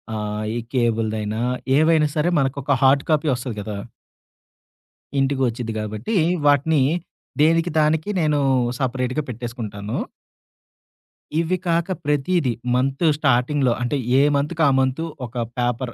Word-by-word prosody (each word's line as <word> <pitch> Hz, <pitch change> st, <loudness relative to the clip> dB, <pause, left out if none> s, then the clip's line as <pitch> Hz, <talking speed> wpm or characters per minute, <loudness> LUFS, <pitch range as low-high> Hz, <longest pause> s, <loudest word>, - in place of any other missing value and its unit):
ఆహ్, 105 Hz, 0 st, -3 dB
ఈ -, -, -1 dB
కేబుల్‌దైనా 110 Hz, -3 st, 0 dB, 0.4 s
ఏవైనా 155 Hz, 0 st, +4 dB
సరే, 155 Hz, +2 st, +2 dB
మనకొక 140 Hz, +1 st, 0 dB
హార్డ్ 135 Hz, +1 st, +5 dB
కాపీ 155 Hz, 0 st, +2 dB
ఒస్తది 125 Hz, -2 st, -5 dB
కదా! 105 Hz, 0 st, -5 dB, 1.4 s
ఇంటికి 135 Hz, 0 st, +1 dB
వచ్చిద్ది 115 Hz, -1 st, -4 dB
కాబట్టి, 110 Hz, -, -3 dB, 0.3 s
వాటిని 145 Hz, +1 st, +3 dB, 0.6 s
దేనికి 165 Hz, +2 st, +3 dB
దానికి 155 Hz, +4 st, +1 dB
నేను 150 Hz, -1 st, +2 dB, 0.4 s
సపరేట్‌గా 130 Hz, +2 st, -1 dB
పెట్టేసుకుంటాను. 115 Hz, -3 st, -5 dB, 1.4 s
ఇవి 170 Hz, +3 st, +1 dB
కాక 170 Hz, +2 st, 0 dB
ప్రతీదీ 145 Hz, 0 st, +1 dB, 0.2 s
మంత్ 135 Hz, +5 st, 0 dB
స్టార్టింగ్‌లో 130 Hz, -2 st, +2 dB
అంటే, 125 Hz, +4 st, 0 dB, 0.2 s
ఏ -, -, +6 dB
మంత్‌కి 155 Hz, +3 st, 0 dB
ఆ -, -, +5 dB
మంతు, 130 Hz, +5 st, 0 dB, 0.2 s
ఒక 120 Hz, +1 st, -13 dB, 0.2 s
పేపర్ 120 Hz, 0 st, -1 dB
135 Hz, 115 wpm, -22 LUFS, 120-150 Hz, 1.4 s, ఏ